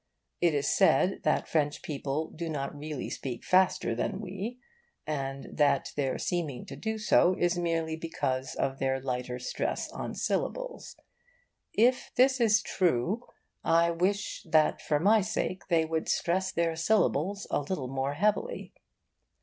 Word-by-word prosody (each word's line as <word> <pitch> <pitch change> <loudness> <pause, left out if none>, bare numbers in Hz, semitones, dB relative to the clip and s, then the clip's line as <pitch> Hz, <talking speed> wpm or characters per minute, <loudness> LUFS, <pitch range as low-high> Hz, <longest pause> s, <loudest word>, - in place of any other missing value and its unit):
It 170 -3 +3
is 145 - 0
said 180 +8 +3
that 155 - +2
French 150 -2 0
people 145 +1 -3
do 165 +1 -5
not 140 -2 -3
really 150 -1 -5
speak 125 -3 -5
faster 185 -9 +3
than 155 +11 -2
we, 200 +4 -5 0.5
and 135 -2 -3
that 145 -2 +2
their 135 -2 0
seeming 160 -8 -2
to - - -8
do 220 0 -3
so 190 -3 +4
is 175 0 +2
merely 165 -2 -1
because 135 -5 -3
of 135 0 -1
their 135 0 0
lighter 125 -1 -3
stress 125 - -3
on - - -5
syllables. - - -3 0.8
If 245 +4 +3
this 260 0 +4
is 220 -1 +4
true, 185 - 0 0.4
I 170 +1 +4
wish 190 +4 -1
that 155 -1 +3
for 150 -1 +1
my 210 +6 +5
sake 185 -2 -3
they 165 -2 +3
would 160 0 -2
stress 190 +2 +1
their 170 -2 0
syllables 195 +1 +1
a - - +2
little 145 -2 -3
more 135 +2 -2
heavily. 210 - 0
165 Hz, 150 wpm, -29 LUFS, 140-190 Hz, 0.8 s, my